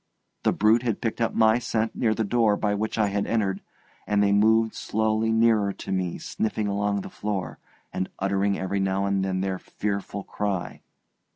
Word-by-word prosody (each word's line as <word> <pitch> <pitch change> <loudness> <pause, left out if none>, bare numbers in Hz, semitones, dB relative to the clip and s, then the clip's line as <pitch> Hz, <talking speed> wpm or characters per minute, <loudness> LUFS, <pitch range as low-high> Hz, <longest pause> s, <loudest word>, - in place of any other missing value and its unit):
The - - +2
brute 110 +3 +3
had 115 -4 -1
picked 115 0 -3
up 115 - 0
my 110 +1 +4
scent 110 -2 -1
near 110 -2 +1
the 110 - 0
door 110 0 +2
by 105 -1 0
which 110 +2 -2
I 105 -2 +2
had 100 0 -1
entered, 100 -4 0 0.5
and 105 -1 +2
they 100 - +3
moved 110 +2 +4
slowly 110 +1 0
nearer 110 -3 +3
to - - -7
me 90 -2 -1
sniffing 110 -1 -2
along 100 0 0
the - - -8
floor, 100 -5 -4 0.3
and 95 - -2
uttering 100 +1 0
every 95 +1 -2
now 95 0 0
and 100 -1 +1
then 95 -1 -1
their 95 -1 -2
fearful 100 -1 -4
cry. 100 -3 -3
105 Hz, 185 wpm, -25 LUFS, 100-110 Hz, 0.5 s, my